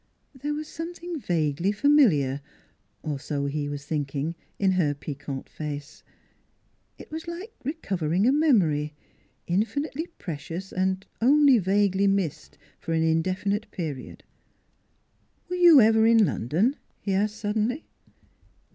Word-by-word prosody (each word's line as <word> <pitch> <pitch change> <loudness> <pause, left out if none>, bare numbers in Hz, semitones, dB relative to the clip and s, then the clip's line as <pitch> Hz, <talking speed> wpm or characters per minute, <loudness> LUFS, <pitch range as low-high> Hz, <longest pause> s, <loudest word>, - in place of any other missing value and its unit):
There 290 +2 -3
was 305 0 -5
something 340 0 -6
vaguely 170 - 0
familiar 200 - +3 0.6
or 150 -3 -3
so 140 0 -3
he 145 +1 -2
was 145 -1 -6
thinking 145 +1 -2 0.2
in 195 -1 +2
her 165 -6 +1
piquant 140 -1 -6
face. 150 -1 -7 1.0
It - - -13
was 320 +2 -6
like 360 +7 -7
recovering 195 - -1
a - - +5
memory, 175 - +2 0.5
NEIGHBORS 200 +9 0
163 285 - +2
infinitely 320 +5 -4
precious 170 +3 -6
and 190 +1 0 0.2
only 275 0 +6
vaguely 200 0 +2
missed 195 -6 -1 0.2
for 165 - -3
an 160 0 +2
indefinite 185 +6 0
period. 150 -7 -6 1.3
"Were - - 0
you 345 -5 +8
ever 220 -1 +5
in 225 -2 +6
London?" 185 - 0 0.2
he 195 - -2
asked 210 +2 +1
sud 210 -1 -3
denly. 245 +8 0
190 Hz, 130 wpm, -26 LUFS, 150-255 Hz, 1.3 s, you